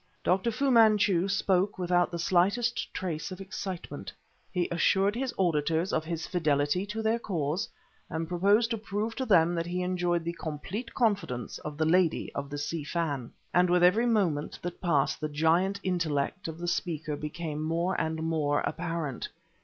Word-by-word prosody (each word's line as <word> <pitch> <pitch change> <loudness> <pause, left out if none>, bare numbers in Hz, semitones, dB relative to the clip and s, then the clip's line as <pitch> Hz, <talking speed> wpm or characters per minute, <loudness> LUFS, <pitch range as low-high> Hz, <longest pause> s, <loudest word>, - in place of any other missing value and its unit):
Dr. 190 +5 +2
Fu 270 +4 +1
Manchu 210 -6 +5
spoke 195 0 +1
without 175 -1 +2
the 170 - -4
slightest 200 +8 +1
trace 175 -1 -4
of 185 - -7
excitement; 190 -1 -6 0.4
he 180 -2 0
assured 195 +4 +3
his 260 +1 -1
auditors 165 0 +1
of 155 - +1
his 165 0 -3
fidelity 155 +2 +1
to 220 +2 -4
their 225 +2 +2
cause 165 -5 -2 0.4
and 160 0 -3
proposed 200 +7 +3
to 225 - -1
prove 210 +2 -3
to 260 -1 -2
them 170 -4 +5
that 170 0 -2
he 180 +1 -2
enjoyed 175 -2 0
the 170 +1 -3
complete 170 - -5
confidence 200 - 0
of 150 -1 -7
the 155 - +1
Lady 170 0 +2
of 140 0 -4
the 145 - -5
Si 150 +2 -3
Fan. 145 -6 -2 0.2
And 180 0 +4
with 175 0 +4
every 215 +7 +5
moment 180 -10 +1
that 175 0 -5
passed 150 -7 +1
the 155 - -1
giant 165 +6 +2
intellect 175 0 -1
of 160 -1 -6
the 175 +1 -5
speaker 160 -3 -2
became 150 +1 -4
more 165 +4 0
and 160 0 -2
more 155 -3 +1
apparent. 165 -5 -3
175 Hz, 170 wpm, -29 LUFS, 160-195 Hz, 0.4 s, Manchu